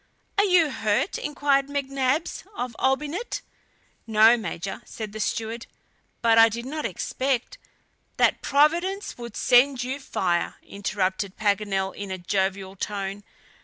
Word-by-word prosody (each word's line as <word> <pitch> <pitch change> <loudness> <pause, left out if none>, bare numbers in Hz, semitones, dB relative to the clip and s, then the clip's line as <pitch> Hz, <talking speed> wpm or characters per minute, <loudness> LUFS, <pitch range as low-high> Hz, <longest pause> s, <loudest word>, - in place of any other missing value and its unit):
"Are - - +6
you 350 -6 +4
hurt?" 220 - 0
inquired 285 -2 +1
McNabbs 275 +1 -1
of 245 - -4
Olbinett. 295 - -1 0.7
"No, 220 +1 +6
Major," 195 -4 -5
said 215 -2 -7
the 215 - -7
steward, 225 +2 -2 0.6
"but 225 -1 +5
I 225 0 +8
did 235 +2 -5
not 305 +3 -4
expect 270 - -2 0.3
" - - -43
"That - - +3
Providence 340 +8 +2
would 235 -3 -7
send 255 +1 +4
you 260 +3 -3
fire," 175 -9 -1
interrupted 195 -1 -2
Paganel 200 -2 0
in 200 -1 -6
a 190 - -3
jovial 190 +1 -1
tone. 200 0 -4
235 Hz, 130 wpm, -25 LUFS, 200-280 Hz, 0.7 s, I